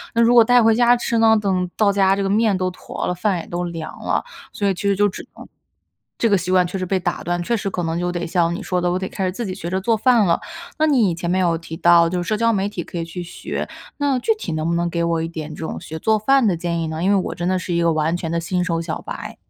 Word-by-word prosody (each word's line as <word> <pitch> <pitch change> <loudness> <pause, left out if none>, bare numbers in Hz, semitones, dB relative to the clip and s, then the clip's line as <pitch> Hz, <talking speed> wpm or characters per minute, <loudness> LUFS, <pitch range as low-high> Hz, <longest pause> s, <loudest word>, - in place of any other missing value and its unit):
那 230 - +4
如 235 +1 +5
果 235 -1 +8
带 245 +1 +4
回 225 0 +5
家 240 +1 +4
吃 235 -1 -1
呢， 225 0 +5
等 195 -3 +1 0.2
到 210 -2 +3
家 195 -1 +3
这 200 - -2
个 195 - -1
面 210 -1 +2
都 185 0 0
坨 - - -6
了， - - 0
饭 180 +1 0
也 - - -8
都 175 +1 -3
凉 165 -2 -6
了， - - 0 0.3
所 205 - -3
以 195 - +2
其 180 - -8
实 200 0 +2
就 205 +1 +3
只 190 - -9
能 - - -11 0.7
这 230 - +2
个 200 - +4
习 185 - -3
惯 180 -1 +4
确 180 - -4
实 185 - -3
被 190 +1 0
打 175 -1 -3
断， 175 0 -1
确 235 +7 0
实 205 -2 -3
可 185 - -3
能 165 0 -2
就 175 0 -1
得 175 -1 -3
像 170 -1 +1
你 180 - -5
说 180 -3 -1
的， 175 0 +1
我 180 - 0
得 190 - -3
开 190 - -3
始 185 - 0
自 230 +6 -5
己 185 - -4
学 170 - -6
着 190 +1 -1
做 225 +3 +1
饭 235 -2 +4
了。 170 -2 +2 0.4
那 310 - +3
你 235 - +3
前 170 +1 -3
面 185 +1 +2
有 170 -2 +2
提 165 0 -8
到 170 -1 +5
就 180 +1 -2
是 175 - -6
社 215 - +1
交 230 +1 +2
媒 195 -1 0
体 190 -4 -5
可 175 - -8
以 165 - -3
去 170 +2 -6
学， 175 - -5 0.3
那 280 -3 +1
具 445 - +2
体 - - -5
能 155 0 -2
不 170 - 0
能 170 0 0
给 170 0 -1
我 165 -1 0
一 - - -2
点 160 -2 -6
这 160 - -6
种 - - -5
学 160 - -7
做 220 +6 +1
饭 270 +3 +3
的 195 -5 +2
建 170 0 -2
议 165 - -2
呢？ 160 +1 -4
因 190 - +2
为 205 - +4
我 190 - -1
真 175 - -3
的 185 0 +1
是 180 -1 -4
一 170 - +1
个 170 0 +3
完 155 +2 0
全 165 -2 -5
的 170 - 0
新 180 +2 -1
手 170 -2 -1
小 160 -2 -4
白。 - - -7
185 Hz, 340 characters per minute, -21 LUFS, 170-210 Hz, 0.7 s, 果